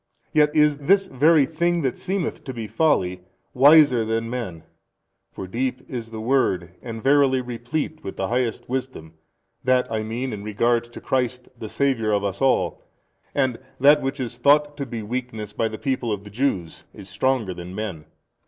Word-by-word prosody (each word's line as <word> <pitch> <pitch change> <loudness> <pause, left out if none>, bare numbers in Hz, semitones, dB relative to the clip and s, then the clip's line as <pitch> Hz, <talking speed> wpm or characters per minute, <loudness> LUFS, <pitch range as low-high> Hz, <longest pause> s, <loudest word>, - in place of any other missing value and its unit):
Yet 150 -1 +3
is 150 -1 +4
this 195 +7 +3
very 155 -2 +4
thing 170 +2 0
that 130 -3 0
seemeth 190 -3 -3
to 130 - -5
he 115 -2 -5
folly, 105 - +1 0.3
wiser 140 -3 +6
than 115 +1 -2
men. 95 -10 -5 0.7
For - - -7
deep 125 +6 -3
is 120 -3 -6
the 110 -1 -7
word 110 -8 +1
and 115 -2 -7
verily 135 -1 +4
replete 125 +6 -4
with 95 - -6
the 95 - -2
highest 120 -1 -1
wisdom, 125 -11 -5 0.5
that 130 -2 +2
I 110 -1 -1
mean 115 +4 -3
in 100 -1 -6
regard 115 +3 +1
to 120 - -12
Christ 125 -1 -1
the 110 -2 -8
Saviour 130 -6 0
of 100 -1 +1
us 100 -1 -3
all, 135 -1 +1 0.5
and 130 -4 +1 0.2
that 145 +3 +6
which 135 0 -3
is 120 -1 -5
thought 145 +3 +4
to 140 -2 -4
be 115 -2 -5
weakness 110 -2 -5
by 115 - 0
the 110 0 -6
people 130 -4 -2
of 100 -1 -3
the 105 - -12
Jews, 100 -8 -2
is 100 - -11
stronger 110 0 0
than 90 +1 -8
men. 95 -8 -5
125 Hz, 180 wpm, -23 LUFS, 110-140 Hz, 0.7 s, wiser